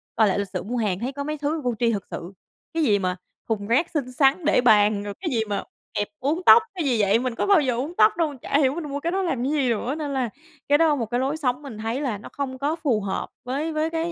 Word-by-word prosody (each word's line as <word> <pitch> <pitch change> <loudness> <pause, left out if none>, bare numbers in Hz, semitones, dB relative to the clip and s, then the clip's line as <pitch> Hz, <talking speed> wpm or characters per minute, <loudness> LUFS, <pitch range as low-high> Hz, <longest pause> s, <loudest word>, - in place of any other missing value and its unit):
coi 220 -2 +4
lại 195 - +1
lịch 200 -2 -3
sử - - -3
mua 240 +4 -3
hàng 200 -5 0
thấy 250 +4 -3
có 280 0 -4
mấy 305 +1 -3
thứ 300 +2 -2
vô 245 -2 -1
tri 235 -1 +3
thực 200 -3 -3
sự, 175 +3 -6 0.4
cái 325 -1 +1
gì 205 -6 +3
mà 180 -1 -1 0.3
thùng 205 -2 -1
rác 280 +9 +2
xinh 265 -5 -2
xắn 275 +5 +2
để 305 - +4
bàn, 210 -3 +4
rồi 205 -1 -5
cái 350 -3 -2
gì 230 - +1
mà 200 - -1 0.3
kẹp 205 - -1
uốn 300 +6 0
tóc 455 - +9
cái 335 -5 -2
gì 240 -5 +2
vậy, 205 +3 +3
mình 250 -2 -2
có - - -1
bao 390 -6 +6
giờ 255 -4 0
uốn 285 +8 -3
tóc 215 0 +6
đâu. 310 -4 0
Chả 285 - +1
hiểu 270 0 +2
mình 340 - -4
mua 285 +1 -3
cái 335 +3 -2
đó 385 +1 0
làm 265 -9 -1
cái 275 - 0
gì 275 -5 +1
nữa. 240 +5 -1
Nên 295 -3 -4
là 255 -4 0 0.4
cái 290 - +6
đó 315 -2 +4
một 235 -4 -2
cái 240 +3 -1
lối 275 +4 -1
sống 255 -2 -1
mình 265 -7 -9
thấy 225 +5 -3
là 240 -8 -1
nó 205 - -11
không 265 -2 -4
có 295 +3 0
phù 270 -10 0
hợp 195 -1 -3 0.2
với 295 +6 -2
với 310 +1 0
cái, 330 +1 -2
260 Hz, 295 wpm, -24 LUFS, 225-305 Hz, 0.4 s, tóc